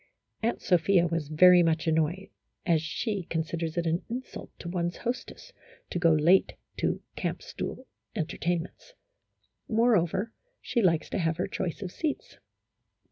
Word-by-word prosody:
Aunt 230 Hz, +1 st, -1 dB
Sophia 180 Hz, -1 st, +4 dB
was 165 Hz, -3 st, -1 dB
very 180 Hz, +4 st, +7 dB
much 160 Hz, -1 st, +1 dB
annoyed, 160 Hz, +4 st, 0 dB, 0.4 s
as 165 Hz, -3 st, +3 dB
she 195 Hz, +4 st, -3 dB
con 160 Hz, -1 st, 0 dB
siders 165 Hz, 0 st, -4 dB
it 170 Hz, -, 0 dB
an 165 Hz, +1 st, +1 dB
insult 250 Hz, +3 st, -6 dB
to -, -, -8 dB
one's 175 Hz, 0 st, -2 dB
hostess 250 Hz, -, -5 dB, 0.4 s
to 175 Hz, -, -1 dB
go 170 Hz, -1 st, +5 dB
late 165 Hz, +5 st, +4 dB, 0.2 s
to -, -, -1 dB
camp -, -, -3 dB
stool 260 Hz, -, -6 dB, 0.3 s
entertainments; 170 Hz, -, -3 dB, 0.8 s
moreover, 220 Hz, -2 st, +2 dB, 0.3 s
she 235 Hz, -, 0 dB
likes 170 Hz, -5 st, +2 dB
to -, -, -1 dB
have 165 Hz, -2 st, 0 dB
her 180 Hz, -, 0 dB
choice 185 Hz, +1 st, -3 dB
of 180 Hz, -, -5 dB
seats. 310 Hz, -, -4 dB
175 Hz, 145 wpm, -28 LUFS, 165-200 Hz, 0.8 s, very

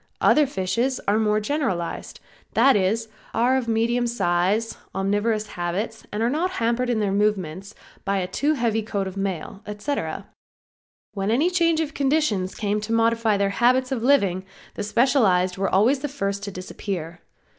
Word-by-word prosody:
Other 300 Hz, -2 st, +4 dB
fishes 235 Hz, +5 st, -1 dB
are 205 Hz, +2 st, +3 dB
more 215 Hz, -1 st, +2 dB
generalized; 210 Hz, -, -3 dB, 0.4 s
that 270 Hz, -1 st, +5 dB
is, 210 Hz, +4 st, +1 dB, 0.3 s
are 245 Hz, +3 st, +3 dB
of 260 Hz, -3 st, -1 dB
medium 235 Hz, +2 st, +1 dB
size, 205 Hz, 0 st, 0 dB, 0.2 s
omnivorous 205 Hz, +3 st, 0 dB
habits, 190 Hz, +6 st, -4 dB
are 220 Hz, +3 st, 0 dB
not 315 Hz, +8 st, 0 dB
hampered 235 Hz, 0 st, 0 dB
in 235 Hz, -3 st, +1 dB
their 205 Hz, -2 st, 0 dB
movements 195 Hz, -2 st, -1 dB, 0.3 s
by 200 Hz, 0 st, 0 dB
a 185 Hz, -, 0 dB
too 285 Hz, +11 st, 0 dB
heavy 230 Hz, -4 st, 0 dB
coat 205 Hz, -2 st, -2 dB
of 190 Hz, 0 st, -6 dB
mail, 195 Hz, 0 st, -4 dB
etc. 210 Hz, +8 st, -3 dB, 0.9 s
When 195 Hz, 0 st, -2 dB
any 290 Hz, +11 st, +2 dB
change 335 Hz, -3 st, +2 dB
of 310 Hz, -2 st, -3 dB
conditions 270 Hz, -10 st, 0 dB
came 210 Hz, 0 st, -1 dB
to 210 Hz, +2 st, -5 dB
modify 230 Hz, -1 st, +2 dB
their 200 Hz, 0 st, +1 dB
habits 255 Hz, +4 st, +2 dB
of 255 Hz, -4 st, -1 dB
living 200 Hz, -9 st, +3 dB, 0.3 s
the -, -, -5 dB
specialized 205 Hz, -5 st, +2 dB
were 195 Hz, -, +1 dB
always 230 Hz, +9 st, +3 dB
the 295 Hz, -, -3 dB
first 200 Hz, -8 st, -3 dB
to 200 Hz, -, -5 dB
disappear. 180 Hz, -2 st, -6 dB
215 Hz, 160 wpm, -24 LUFS, 195-250 Hz, 0.9 s, that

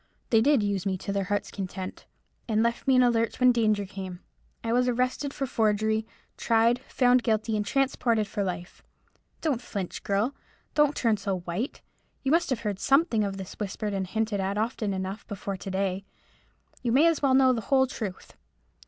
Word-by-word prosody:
They 225 Hz, -2 st, +5 dB
did 275 Hz, -2 st, +4 dB
use 200 Hz, -2 st, -1 dB
me 190 Hz, -1 st, 0 dB
to 200 Hz, -, -4 dB
their 200 Hz, -1 st, 0 dB
heart's 205 Hz, +1 st, -2 dB
content, 190 Hz, -1 st, -6 dB, 0.4 s
and 220 Hz, -1 st, +2 dB
left 235 Hz, +2 st, -1 dB
me 265 Hz, -, +5 dB
in 255 Hz, -, +6 dB
the 245 Hz, -1 st, +5 dB
lurch 230 Hz, 0 st, 0 dB
when 255 Hz, -1 st, +6 dB
danger 215 Hz, -4 st, +2 dB
came. 190 Hz, -2 st, -7 dB, 0.4 s
I 230 Hz, 0 st, 0 dB
was 250 Hz, +1 st, +3 dB
arrested 255 Hz, +3 st, 0 dB
for 275 Hz, -, -3 dB
forgery, 220 Hz, -2 st, +1 dB, 0.3 s
tried, 230 Hz, +1 st, +3 dB
found 250 Hz, -1 st, +3 dB
guilty, 220 Hz, -1 st, 0 dB
and 210 Hz, -, 0 dB
transported 235 Hz, -2 st, +1 dB
for 205 Hz, 0 st, -3 dB
life. 175 Hz, -2 st, -5 dB, 0.6 s
Don't 280 Hz, -7 st, 0 dB
flinch, 195 Hz, -6 st, -5 dB
girl! 205 Hz, +7 st, 0 dB, 0.4 s
don't 295 Hz, -1 st, +3 dB
turn 225 Hz, -3 st, +2 dB
so 195 Hz, -3 st, -2 dB
white! 180 Hz, +9 st, -4 dB, 0.4 s
You 270 Hz, -, +1 dB
must 335 Hz, +2 st, +3 dB
have 250 Hz, -4 st, -1 dB
heard 205 Hz, -3 st, -3 dB
something 275 Hz, -5 st, +3 dB
of 195 Hz, -1 st, -3 dB
this 190 Hz, -1 st, -7 dB
whispered 210 Hz, 0 st, -3 dB
and 190 Hz, -1 st, -2 dB
hinted 220 Hz, +1 st, -1 dB
at 195 Hz, +1 st, -1 dB
often 220 Hz, -1 st, -1 dB
enough 190 Hz, +2 st, -5 dB
before 200 Hz, -1 st, -4 dB
to 195 Hz, -, -7 dB
day. 190 Hz, 0 st, -1 dB, 0.8 s
You 240 Hz, -, 0 dB
may 275 Hz, +7 st, +5 dB
as 330 Hz, -2 st, +3 dB
well 270 Hz, -2 st, +4 dB
know 260 Hz, -1 st, +5 dB
the 230 Hz, -, -2 dB
whole 265 Hz, -1 st, +5 dB
truth. 215 Hz, -7 st, -6 dB
220 Hz, 190 wpm, -27 LUFS, 200-250 Hz, 0.8 s, in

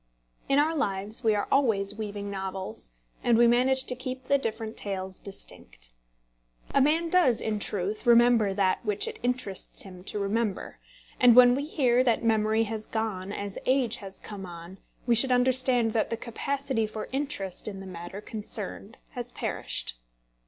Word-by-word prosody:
In 275 Hz, -, +4 dB
our 305 Hz, +3 st, +3 dB
lives 205 Hz, -6 st, -1 dB
we 220 Hz, -2 st, +3 dB
are 205 Hz, -, -1 dB
always 220 Hz, -8 st, +2 dB
weaving 205 Hz, -1 st, -5 dB
novels, 190 Hz, -1 st, -6 dB, 0.3 s
and 235 Hz, -2 st, +4 dB
we 240 Hz, -, +6 dB
manage 255 Hz, +3 st, +4 dB
to -, -, -2 dB
keep 255 Hz, 0 st, -5 dB
the 280 Hz, +2 st, +2 dB
different 225 Hz, -2 st, -4 dB
tales 190 Hz, -2 st, -4 dB
distinct. -, -, -7 dB, 0.8 s
A 275 Hz, -, +4 dB
man 320 Hz, +5 st, +2 dB
does, 310 Hz, -11 st, +4 dB
in 215 Hz, -1 st, -1 dB
truth, 205 Hz, +3 st, -3 dB
remember 235 Hz, -3 st, +5 dB
that 190 Hz, -1 st, +1 dB
which 210 Hz, -2 st, 0 dB
it -, -, -6 dB
interests 245 Hz, -6 st, -1 dB
him 185 Hz, -2 st, -11 dB
to -, -, -4 dB
remember; 205 Hz, 0 st, -2 dB, 0.4 s
and 245 Hz, -2 st, +7 dB
when 245 Hz, 0 st, +8 dB
we 280 Hz, +3 st, -1 dB
hear 255 Hz, -5 st, +2 dB
that 240 Hz, -2 st, +1 dB
memory 220 Hz, 0 st, +2 dB
has 220 Hz, -1 st, -5 dB
gone 205 Hz, -4 st, -3 dB
as 200 Hz, -1 st, -5 dB
age 255 Hz, -3 st, +2 dB
has 195 Hz, -2 st, -9 dB
come 205 Hz, -2 st, -7 dB
on, 170 Hz, +2 st, -10 dB, 0.3 s
we 240 Hz, -, +3 dB
should 255 Hz, +3 st, +4 dB
understand 250 Hz, -2 st, +3 dB
that 220 Hz, -, +1 dB
the 230 Hz, -, -2 dB
capacity 260 Hz, 0 st, -2 dB
for 215 Hz, 0 st, -6 dB
interest 265 Hz, -11 st, -3 dB
in 200 Hz, -2 st, -5 dB
the 195 Hz, -, -9 dB
matter 180 Hz, +2 st, -8 dB
concerned 210 Hz, 0 st, -5 dB
has 245 Hz, -3 st, -4 dB
perished. -, -, -3 dB
220 Hz, 165 wpm, -27 LUFS, 200-250 Hz, 0.8 s, when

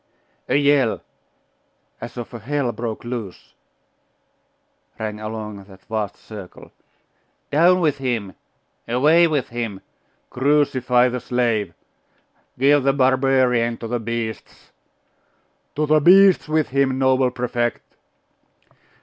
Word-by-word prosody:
A -, -, +2 dB
yell, 140 Hz, -4 st, +2 dB, 1.0 s
as 120 Hz, -, -8 dB
of 120 Hz, 0 st, -7 dB
all 120 Hz, -, -7 dB
hell 135 Hz, +2 st, -2 dB
broke 115 Hz, -2 st, -5 dB
loose, 120 Hz, -6 st, -7 dB, 1.4 s
rang 105 Hz, -1 st, -5 dB
along 110 Hz, -2 st, -6 dB
that 95 Hz, -1 st, -18 dB
vast 110 Hz, -3 st, -3 dB
circle 100 Hz, -5 st, -12 dB, 0.8 s
'Down 175 Hz, +5 st, +4 dB
with 150 Hz, -4 st, +1 dB
him!' 115 Hz, -7 st, -3 dB, 0.5 s
'Away 150 Hz, +8 st, +4 dB
with 150 Hz, -6 st, -1 dB
him!' 115 Hz, -5 st, -5 dB, 0.5 s
'Crucify 130 Hz, -3 st, +2 dB
the 125 Hz, +1 st, -3 dB
slave!' 115 Hz, -7 st, -1 dB, 0.8 s
'Give 140 Hz, +3 st, +4 dB
the 135 Hz, +1 st, +2 dB
barbarian 130 Hz, -3 st, +2 dB
to 115 Hz, -, -7 dB
the 120 Hz, +1 st, -2 dB
beasts!' 115 Hz, -1 st, -6 dB, 1.0 s
'To 150 Hz, -, 0 dB
the 155 Hz, +1 st, +3 dB
beasts 190 Hz, +4 st, +5 dB
with 155 Hz, -1 st, +1 dB
him, 135 Hz, -1 st, +1 dB
noble 130 Hz, -1 st, +2 dB
Prefect! 120 Hz, -1 st, -2 dB
125 Hz, 110 wpm, -21 LUFS, 115-140 Hz, 1.4 s, beasts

